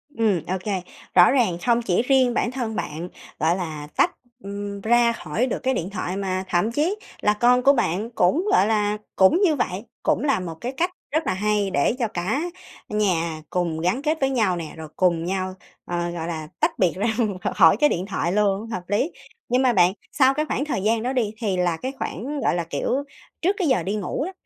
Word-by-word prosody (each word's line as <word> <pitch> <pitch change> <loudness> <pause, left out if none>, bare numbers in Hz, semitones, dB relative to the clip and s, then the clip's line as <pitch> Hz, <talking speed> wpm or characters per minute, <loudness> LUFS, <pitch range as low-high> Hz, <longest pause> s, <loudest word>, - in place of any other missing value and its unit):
Ừm, 215 -7 +2
ô 185 - -1
kê. 195 -3 -1 0.3
Rõ 175 +4 +8
ràng 230 -10 +2
không 240 -1 +3
chỉ 185 -4 +1
riêng 255 -1 +3
bản 235 - 0
thân 240 -4 -3
bạn, 165 +1 -4 0.3
gọi 165 +3 +2
là, 155 -5 -5
tách, - - +4 0.3
ừm, 200 0 -5
ra 235 +1 +4
khỏi 220 +3 -2
được - - -2
cái 265 0 +2
điện 180 -5 -2
thoại, 190 -1 -3
mà 190 -1 -2
thậm 180 +6 +1
chí 310 - +1 0.3
là 210 - +3
con 245 +3 +3
của 280 +2 +6
bạn 215 -2 0
cũng, 235 - +2
gọi 200 - +4
là, 210 -1 +1 0.2
cũng 190 - +5
như 330 -7 +4
vậy, 195 -3 -2 0.2
cũng 255 - +1
là 275 -7 +2
một 170 -3 -5
cái 245 - -3
cách 340 +7 -1 0.2
rất 315 0 0
là - - +2
hay 205 +1 0
để 140 +7 +2
cho 235 - +1
cả 210 - -2 0.5
nhà 170 -7 0
cùng 170 -3 -1
gắn 180 +10 0
kết 310 +2 0
với 270 - +3
nhau 220 -9 +1
nè, 165 -3 -6
rồi 160 -1 -7
cùng 170 -3 +2
nhau, 185 0 -2 0.3
ờ, 175 0 -2
gọi 165 -1 -4
là, 160 -2 -4
tách - - 0
biệt 180 -4 +3
ra 200 +4 0 0.5
khỏi 170 -1 +6
cái 295 +5 +4
điện 180 +2 -1
thoại 185 -3 -1
luôn, 205 +1 +1
hợp 185 -6 -4
lý. 215 - 0 0.4
Nhưng 250 +2 +3
mà 250 -2 +3
bạn, 180 -1 +4 0.2
sau 265 -1 +4
cái 305 +2 -1
khoảng 285 -2 -2
thời 260 -10 -2
gian 220 +1 +1
đó 255 +2 -1
đi 230 -5 0
thì 205 -5 -1
là 175 -2 +1
cái 260 +9 -4
khoảng, 280 - -4
gọi - - +2
là, 175 - -1
kiểu, 165 - -3 0.5
trước 380 +4 +2
cái 360 -6 0
giờ 260 - +2
đi 200 +2 -2
ngủ 215 +7 -2
đó, 375 - -5
205 Hz, 225 wpm, -23 LUFS, 180-250 Hz, 0.5 s, Rõ